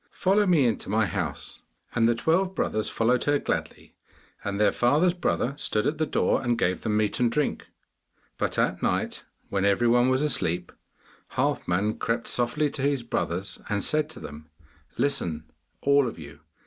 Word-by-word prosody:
Follow 200 +2 +2
me 165 -7 +4
into 115 -4 -1
my 110 +1 +2
house.' 90 - -4 0.3
And 115 -1 +3
the 120 - +2
twelve 185 +9 +1
brothers 110 0 -1
followed 120 +2 +1
her 145 0 +3
gladly, - - -4 0.5
and 100 0 -3
their 105 - +4
father's 150 +9 +3
brother 155 -6 -1
stood 105 -7 -1
at 150 +1 -1
the 155 - +1
door, - - +1
and 120 -2 0
gave 90 +1 0
them 105 -1 0
meat 105 -1 0
and 120 -2 +2
drink. 150 +4 -1 0.7
But - - -1
at - - +1
night, - - -1 0.2
when 95 -1 -1
every 100 +4 +3
one 120 +2 +4
was 130 +2 +2
asleep, 90 - 0 0.6
Halfman 100 +5 0
crept 115 0 -1
softly 140 +5 0
to 135 - -5
his 140 -2 +1
brothers, 95 -4 -3
and 100 -1 0
said 155 -1 +2
to 160 - -10
them, 75 +1 -10 0.5
'Listen, 85 - 0 0.4
all 140 -1 +4
of 115 - -6
you! 75 -2 -11
120 Hz, 175 wpm, -26 LUFS, 100-145 Hz, 0.7 s, me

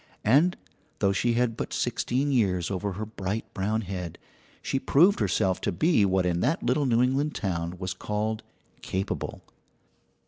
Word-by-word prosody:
And 145 - +4 0.4
though 100 - +2
she 120 +5 +1
had 120 -1 +1
but - - -4
sixteen 135 +4 0
years 95 -8 +1
over 100 +1 -2
her 110 +4 -4
bright 105 0 -4
brown 105 +3 0
head, 90 -4 -5 0.5
she 135 - 0
proved 175 +10 +4
herself 95 -4 +1
to 100 - 0
be 110 - +3
what 95 -1 +2
in 85 -1 +1
that 140 - 0
little 130 +3 +1
New 120 0 +3
England 140 +4 0
town 85 -3 -2
was 90 0 -3
called 105 +3 -2 0.4
"capable." 95 +2 -3
105 Hz, 160 wpm, -27 LUFS, 95-125 Hz, 0.5 s, And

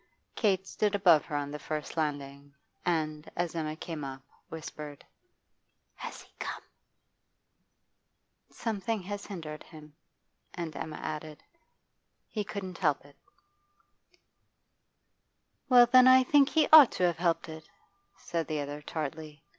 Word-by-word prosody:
Kate 195 -4 +1
stood 205 +1 0
above 175 -7 +5
her 150 - -5
on 145 0 -2
the 150 - -6
first 155 -1 -5
landing, 140 -2 -4 0.3
and, 155 -3 -1
as 175 -1 -2
Emma 155 -2 -3
came 160 -2 -6
up, 135 -1 -7 0.3
whispered: 150 -2 -8 0.9
'Has - - -8
he - - -24
come?' - - -5 1.9
'Something 220 -2 -3
has 205 +2 -6
hindered 160 -6 -7
him.' 155 -2 -14 0.6
And 165 -4 -5
Emma 155 -1 -5
added, 155 -1 -6 0.8
'He 210 - -3
couldn't 190 -3 -6
help 150 -6 +1
it.' 145 - -18 2.5
'Well, 245 -2 +8
then, 255 +2 +7
I 260 0 +8
think 280 +1 +4
he 315 0 +3
ought 300 -6 +11
to - - -2
have 175 -2 +1
helped 170 -2 +1
it,' 160 -1 -10 0.5
said 170 -3 -3
the 155 -1 -2
other 145 +1 -5
tartly. 155 0 -6
160 Hz, 130 wpm, -30 LUFS, 150-195 Hz, 2.5 s, ought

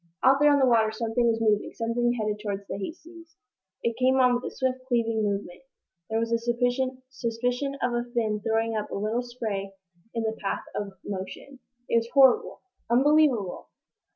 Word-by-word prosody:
Out 270 +1 +6
there 295 0 +6
on 285 - +5
the 270 - +4
water 225 -3 +4
something 230 +2 0
was 225 -1 +2
moving 215 -2 +1
something 240 +1 0
headed 210 -1 -1
toward 200 -2 -4
the - - -4
"Hastings." 330 - -9 0.5
It 230 -1 0
came 260 +1 +4
on 250 -1 +5
with 245 +1 -1
a - - -2
swift, 260 -1 -1
cleaving 230 -3 +1
movement. 200 -3 -3 0.5
There 220 - 0
was 230 0 -1
a 230 - +2
suspicion 250 +1 -1
of 245 - +1
a 240 0 -1
fin 220 -3 0
throwing 225 +1 0
up 210 -1 -3
a - - -5
little 215 +4 -1
spray 215 -6 -5 0.4
in 230 - -1
the 220 0 -1
path 195 - -2
of 200 -1 -4
motion. 205 +7 -7 0.3
It - - +2
was 230 0 -7
horrible 265 -2 +5 0.3
unbelievable! 260 -5 +3
235 Hz, 180 wpm, -26 LUFS, 220-255 Hz, 0.5 s, Out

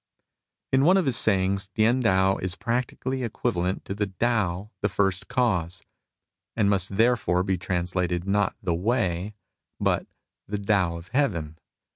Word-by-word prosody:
In 130 +1 +4
one 180 +5 +6
of 190 - +2
his 130 -4 +1
sayings 95 -2 +1
T^ien 115 +4 +3
Tao 95 -3 +3
is 95 -1 -3
practically 125 +3 -2
equivalent 100 -6 -2
to - - -4
Tao 100 -1 -1
the 100 - +1
First 95 -1 0
Cause, 105 -10 0 0.7
and 105 -3 +2
must 95 0 -1
therefore 115 -6 +3
be 95 -2 -1
trans 90 -1 -2
lated 90 -1 -1
not 100 0 +1
the 85 - 0
Way 95 0 -1 0.4
but - - 0 0.4
the 105 - -2
Tao 100 -4 +1
of 85 +3 -12
Heaven. 85 - -1
100 Hz, 145 wpm, -26 LUFS, 90-115 Hz, 0.7 s, one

